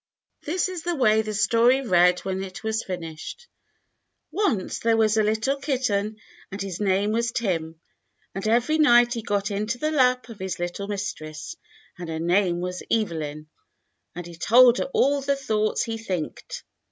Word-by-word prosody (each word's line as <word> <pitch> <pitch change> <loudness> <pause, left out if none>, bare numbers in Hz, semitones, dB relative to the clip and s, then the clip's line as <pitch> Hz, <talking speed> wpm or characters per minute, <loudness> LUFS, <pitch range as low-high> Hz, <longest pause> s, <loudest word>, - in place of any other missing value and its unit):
This 355 +5 0
was 365 -2 -5
the 345 +1 -2
way 220 -6 +3
the 215 -1 -5
story 235 +5 +3
read 180 -6 +3
when 190 0 -3
it 190 -1 -8
was 220 0 -1
fin 180 -2 -5
ished: 165 - -8 0.4
— - - -53
"Once 355 - -1
there 230 -1 +2
was 220 -1 +3
a 220 - +3
little 220 +6 0
kitten 245 -7 -1 0.3
and 195 - -6
his 195 -3 -5
name 200 +1 +1
was 230 +1 0
Tim, 165 -8 -2 0.5
and 195 +2 -4
every 245 +8 +2
night 240 -5 +5
he 230 - -4
got 205 -2 -1
into 215 +5 -2
the 305 +4 -1
lap 255 -4 +2
of 225 - -10
his 190 -1 -4
little 175 +3 -4
mistress, 155 -7 -5 0.4
and 175 -2 -6
her 160 - -3
name 175 +1 +1
was 180 0 -4
Evelyn, 155 -8 -2 0.7
and 175 0 -6
he 170 - -10
told 240 +8 +5
her - - 0
all 280 +1 +2
the 280 +1 0
thoughts 215 -6 0
he 225 -1 -4
thinked. 185 -8 -5
215 Hz, 175 wpm, -24 LUFS, 185-240 Hz, 0.7 s, night